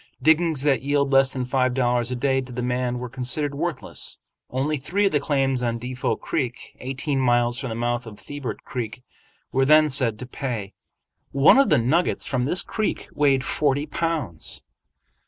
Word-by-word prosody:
Diggings 160 Hz, 0 st, +3 dB
that 140 Hz, -3 st, +2 dB
yield 140 Hz, 0 st, +1 dB
less 135 Hz, 0 st, +5 dB
than 130 Hz, -1 st, -3 dB
five 130 Hz, 0 st, +1 dB
dollars 120 Hz, -2 st, +1 dB
a 125 Hz, -, -2 dB
day 135 Hz, +1 st, +1 dB
to 130 Hz, -1 st, -10 dB
the 125 Hz, 0 st, -4 dB
man 125 Hz, 0 st, -1 dB
were 125 Hz, 0 st, -4 dB
considered 135 Hz, +4 st, -2 dB
worthless. 155 Hz, +3 st, -2 dB, 0.3 s
Only 140 Hz, +4 st, -1 dB
three 185 Hz, +9 st, 0 dB
of 195 Hz, -, +3 dB
the 145 Hz, -, +2 dB
claims 135 Hz, -3 st, 0 dB
on 120 Hz, -1 st, -1 dB
Defot 125 Hz, +1 st, -2 dB
Creek, 125 Hz, -5 st, -3 dB
eighteen 135 Hz, +2 st, -2 dB
miles 120 Hz, -1 st, +2 dB
from 135 Hz, -2 st, -4 dB
the 110 Hz, -, -4 dB
mouth 120 Hz, +1 st, -2 dB
of 105 Hz, -2 st, -10 dB
Thibert 145 Hz, 0 st, -6 dB
Creek, 125 Hz, -1 st, -5 dB, 0.5 s
were 135 Hz, -, +2 dB
then 155 Hz, +2 st, +6 dB
said 125 Hz, -5 st, +1 dB
to 125 Hz, -, -7 dB
pay. 120 Hz, -6 st, -5 dB, 0.6 s
One 140 Hz, -, +6 dB
of 275 Hz, -, +4 dB
the 150 Hz, -, +5 dB
nuggets 145 Hz, +10 st, +1 dB
from 125 Hz, -2 st, -1 dB
this 175 Hz, +7 st, +1 dB
creek 215 Hz, -1 st, -3 dB
weighed 140 Hz, -3 st, +3 dB
forty 145 Hz, 0 st, +1 dB
pounds. 155 Hz, -, -2 dB
130 Hz, 180 wpm, -24 LUFS, 125-145 Hz, 0.6 s, then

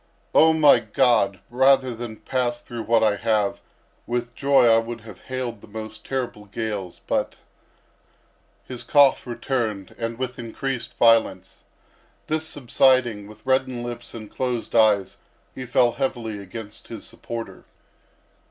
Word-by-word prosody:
—"Oh, 160 Hz, +1 st, +6 dB
my 150 Hz, -5 st, +6 dB
God! 110 Hz, -4 st, +2 dB
rather 130 Hz, 0 st, +4 dB
than 115 Hz, -1 st, -7 dB
pass 120 Hz, -1 st, -2 dB
through 120 Hz, -1 st, -7 dB
what 115 Hz, 0 st, +2 dB
I 105 Hz, -2 st, +3 dB
have, 110 Hz, -3 st, 0 dB, 0.5 s
with 120 Hz, 0 st, -2 dB
joy 140 Hz, 0 st, +4 dB
I 115 Hz, -1 st, +6 dB
would 115 Hz, 0 st, -6 dB
have 105 Hz, -4 st, -12 dB
hailed 125 Hz, -4 st, -4 dB
the -, -, -14 dB
most 110 Hz, +1 st, -8 dB
terrible 125 Hz, -6 st, -4 dB
gales; 100 Hz, -3 st, -5 dB
but—" -, -, -1 dB, 1.3 s
His 125 Hz, -2 st, -7 dB
cough 140 Hz, -3 st, +4 dB
returned 115 Hz, -6 st, -3 dB
and 115 Hz, 0 st, -3 dB
with 130 Hz, 0 st, -4 dB
increased 120 Hz, +2 st, -4 dB
violence; 115 Hz, -5 st, +2 dB, 0.6 s
this 155 Hz, 0 st, -1 dB
subsiding; 125 Hz, -6 st, +2 dB
with 110 Hz, 0 st, -15 dB
reddened 130 Hz, -2 st, 0 dB
lips 120 Hz, -1 st, -7 dB
and 110 Hz, -2 st, -8 dB
closed 125 Hz, 0 st, -3 dB
eyes 105 Hz, -4 st, +3 dB, 0.3 s
he 130 Hz, -1 st, -7 dB
fell 120 Hz, 0 st, +3 dB
heavily 115 Hz, -5 st, -3 dB
against 105 Hz, +2 st, -9 dB
his -, -, -8 dB
supporter. 115 Hz, -1 st, -8 dB
120 Hz, 135 wpm, -23 LUFS, 110-130 Hz, 1.3 s, Oh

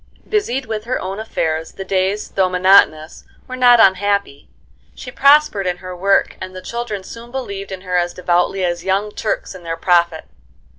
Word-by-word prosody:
Busied 275 Hz, -, -1 dB
with 220 Hz, -2 st, -5 dB
her 255 Hz, +2 st, -2 dB
own 190 Hz, +2 st, -5 dB
affairs, 160 Hz, -7 st, -3 dB
the 195 Hz, -, -7 dB
days 190 Hz, +2 st, -1 dB
though 190 Hz, -1 st, +1 dB
monotonous 180 Hz, -4 st, +3 dB, 0.2 s
were 255 Hz, -, -6 dB
not 245 Hz, -2 st, +5 dB
unhappy. 200 Hz, -, +1 dB, 0.5 s
She 250 Hz, -, -9 dB
prospered 280 Hz, -8 st, +4 dB
in 180 Hz, -1 st, -1 dB
her 185 Hz, 0 st, -8 dB
work 195 Hz, +2 st, +1 dB
and 185 Hz, 0 st, -7 dB
the 185 Hz, -, -7 dB
children 235 Hz, -5 st, -5 dB
soon 230 Hz, +4 st, -11 dB
believed 200 Hz, -7 st, -6 dB
in 190 Hz, -1 st, -6 dB
her 180 Hz, -1 st, -2 dB
as 175 Hz, 0 st, -1 dB
devoutly 180 Hz, +1 st, 0 dB
as 175 Hz, -1 st, -2 dB
young 195 Hz, +3 st, -1 dB
Turks 215 Hz, -1 st, -3 dB
in 185 Hz, -, -11 dB
their 165 Hz, -1 st, -5 dB
Prophet. 170 Hz, -1 st, +1 dB
195 Hz, 180 wpm, -18 LUFS, 180-220 Hz, 0.5 s, not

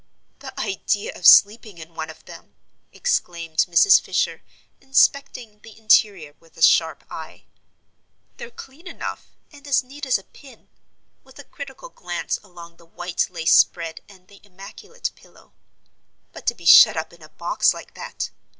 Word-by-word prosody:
"The 265 Hz, -1 st, -10 dB
idea 205 Hz, 0 st, -2 dB
of 180 Hz, -, +1 dB
sleeping 210 Hz, -2 st, +5 dB
in 160 Hz, 0 st, -13 dB
one 160 Hz, -1 st, -6 dB
of 160 Hz, -, -14 dB
them!" -, -, -15 dB, 0.4 s
exclaimed 170 Hz, -, -2 dB
Mrs. 175 Hz, -, +5 dB
Fisher, -, -, -2 dB, 0.4 s
inspecting 265 Hz, -4 st, 0 dB
the 220 Hz, 0 st, -16 dB
interior 205 Hz, -8 st, +2 dB
with 165 Hz, -1 st, -25 dB
a 165 Hz, -, -2 dB
sharp 160 Hz, -1 st, +3 dB
eye. 160 Hz, -1 st, -10 dB, 0.9 s
"They're 475 Hz, -, -9 dB
clean 325 Hz, -, -14 dB
enough 335 Hz, -, -7 dB, 0.2 s
and 290 Hz, -1 st, -16 dB
as 275 Hz, -1 st, +1 dB
neat 280 Hz, +2 st, -10 dB
as 255 Hz, -, +2 dB
a 195 Hz, -, -15 dB
pink" 275 Hz, +5 st, -19 dB, 0.5 s
with -, -, -20 dB
a -, -, -11 dB
critical -, -, -11 dB
glance -, -, -5 dB
along 170 Hz, -3 st, -15 dB
the 170 Hz, -, -20 dB
white 175 Hz, +1 st, -3 dB
lace 170 Hz, -2 st, 0 dB
spread 165 Hz, -1 st, +2 dB
and 185 Hz, -2 st, -19 dB
the 200 Hz, 0 st, -19 dB
immaculate 200 Hz, -, -9 dB
pillow -, -, -22 dB, 0.8 s
"but -, -, -13 dB
to 235 Hz, -, +1 dB
be 170 Hz, -, -16 dB
shut 165 Hz, -, +8 dB
up 160 Hz, +1 st, -5 dB
in 170 Hz, -, -19 dB
a 155 Hz, -, -15 dB
box -, -, 0 dB
like -, -, -10 dB
that. -, -, -7 dB
195 Hz, 160 wpm, -21 LUFS, 170-265 Hz, 0.9 s, shut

